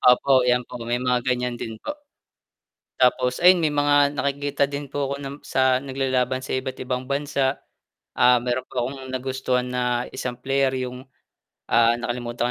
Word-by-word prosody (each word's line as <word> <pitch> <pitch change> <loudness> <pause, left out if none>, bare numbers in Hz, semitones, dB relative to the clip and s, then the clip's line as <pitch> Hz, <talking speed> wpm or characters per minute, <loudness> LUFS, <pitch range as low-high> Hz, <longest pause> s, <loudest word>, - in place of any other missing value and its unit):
Opo, 130 +1 +5
'yan 125 0 +2
po 125 0 -9
may 120 +1 -1
mga 125 -1 +2
gan'yan 125 -1 0
din 110 -1 -5
po. 295 - -5 1.0
Tapos 125 0 +2
ayun 180 -1 +7
may 155 -2 +2
mga 145 0 +3
nakikita 140 0 0
din 140 0 -4
po 140 0 -2
ako - - -1
ng 140 0 -6
sa 130 -1 +2
naglalaban 130 -1 0
sa 130 - -3
iba't 130 0 -4
ibang 125 0 -3
bansa, 140 0 -1 0.5
ah, 125 0 +5
meron 125 +1 -2
pa 120 -2 -2
akong 135 0 -6
nagustuhan 130 -1 -1
na 125 -1 -1
isang 125 -2 -4
player 135 +1 0
yung, 125 +1 -8 0.6
ah, 115 0 +5
nakalimutan 120 0 -2
130 Hz, 165 wpm, -23 LUFS, 125-140 Hz, 1.0 s, ayun